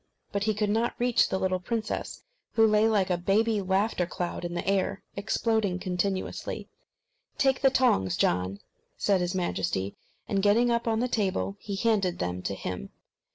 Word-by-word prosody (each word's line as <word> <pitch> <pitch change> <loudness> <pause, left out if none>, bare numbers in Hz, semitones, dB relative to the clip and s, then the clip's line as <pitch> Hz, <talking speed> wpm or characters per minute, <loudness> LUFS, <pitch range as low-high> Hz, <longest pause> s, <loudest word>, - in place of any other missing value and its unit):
But, 200 0 -1
he 215 -1 +1
could 210 0 0
not 230 +3 +1
reach 245 0 +3
the 190 - 0
little 185 -1 0
princess, 220 +3 -3 0.3
who 225 - +5
lay 215 0 +4
like 195 -4 +2
a 175 - +1
baby 210 +4 +2
laughter 190 -1 +1
cloud 175 0 -4
in 175 0 -4
the 175 - -3
air, 195 0 0
exploding 215 -1 0
continuously. 185 +1 -3 0.7
"Take 270 -1 +2
the 270 - +6
tongs, 95 - +2
John," 90 +2 +1 0.4
said 195 -3 +2
his 180 +1 -1
Majesty; 100 - -1 0.3
and 195 -1 +1
getting 225 +4 +4
up 235 0 0
on 225 0 +1
the 250 - +1
table, 195 -4 -1
he 200 - -5
handed 195 -4 +1
them 90 0 -2
to 95 +2 -3
him. 90 -8 -5
195 Hz, 170 wpm, -28 LUFS, 180-220 Hz, 0.7 s, the